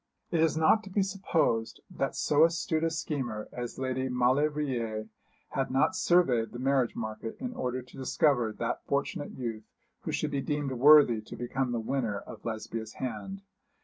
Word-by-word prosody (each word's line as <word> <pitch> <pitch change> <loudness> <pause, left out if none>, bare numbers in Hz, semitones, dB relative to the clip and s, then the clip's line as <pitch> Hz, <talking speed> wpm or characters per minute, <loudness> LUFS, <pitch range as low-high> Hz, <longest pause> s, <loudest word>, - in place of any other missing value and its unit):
It 170 - +1
is 160 -1 +3
not 160 +7 +4
to 195 - -10
be 195 +1 +2
supposed 175 - 0
that - - -2
so 150 +1 +3
astute 165 -1 +1
a 165 - +3
schemer 130 -9 -3
as 120 -1 -6
Lady 130 0 -1
Maulevrier 125 -4 0 0.4
had 135 - -1
not 135 +8 +2
surveyed 170 -12 +3
the - - -5
marriage 130 -1 +1
market 110 0 -5
in 250 -1 -4
order 125 - -3
to 125 - -16
discover 130 -3 +2
that 115 +2 -3
fortunate 145 +2 -2
youth 115 -4 -5 0.3
who - - -5
should - - -1
be 140 -1 -1
deemed 145 -1 -2
worthy 130 -3 +6
to 110 - -10
become 125 +2 -2
the 120 - -1
winner 115 -3 -1
of - - -10
Lesbia's 110 -1 -5
hand. 130 - -5
130 Hz, 170 wpm, -29 LUFS, 115-155 Hz, 0.4 s, worthy